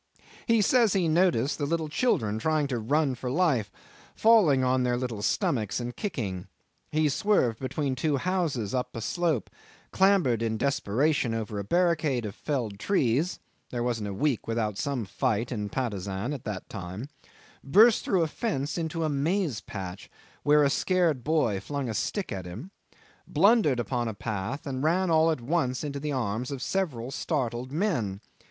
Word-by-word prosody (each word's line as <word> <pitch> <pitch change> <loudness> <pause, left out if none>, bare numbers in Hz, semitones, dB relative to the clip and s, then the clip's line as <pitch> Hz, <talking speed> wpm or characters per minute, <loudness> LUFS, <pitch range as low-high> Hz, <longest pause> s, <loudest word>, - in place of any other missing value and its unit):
He 230 -3 +4
says 230 -1 +4
he 185 -4 +2
noticed 160 -6 +2
the 145 - -1
little 160 0 -1
children 135 - 0
trying 155 +3 +1
to 125 -3 -1
run 140 +5 +1
for 125 0 -5
life, 130 - +1 0.4
falling 195 - +5
on 130 0 +2
their 125 -1 +1
little 120 -5 -3
stomachs 105 0 0
and 120 0 -5
kicking. 105 - -4 0.4
He 155 0 +2
swerved 140 - +1
between 135 +1 -2
two 140 +3 0
houses 160 - -1
up 125 -1 -2
a 115 - -4
slope, 155 - -1 0.4
clambered 190 - +3
in 110 -1 -1
desperation 135 0 +1
over 105 -2 -3
a - - -3
barricade 155 - +1
of 105 - -5
felled 115 -9 -3
trees 150 - +1 0.3
(there 120 -1 -2
wasn't 115 -4 -1
a 100 - -4
week 140 -1 0
without 115 -2 -1
some 130 +1 -2
fight 105 +4 -1
in 105 -4 -3
Patusan 100 0 -3
at 135 - -7
that 105 -3 -5
time), 100 +4 -6 0.6
burst 210 - +5
through 185 -4 +2
a - - 0
fence 155 - -2
into 165 0 -2
a - - +1
maize 150 - 0
patch, 95 -2 -7 0.3
where 150 0 +5
a 140 - +3
scared 170 -5 +1
boy 145 -10 +1
flung 140 +4 -4
a 115 - -2
stick 195 - -2
at 95 -2 -5
him, 115 - -8 0.6
blundered 180 - +4
upon 120 +1 -1
a 110 - -4
path, 110 +6 -4
and 130 -2 -3
ran 175 +3 +2
all 160 0 +5
at 155 -6 -1
once 130 -1 0
into 140 -1 -4
the 150 +1 -3
arms 120 -2 -2
of 135 -3 -4
several 135 -11 -2
startled 130 -5 -2
men. 135 - -1
135 Hz, 170 wpm, -27 LUFS, 115-160 Hz, 0.6 s, falling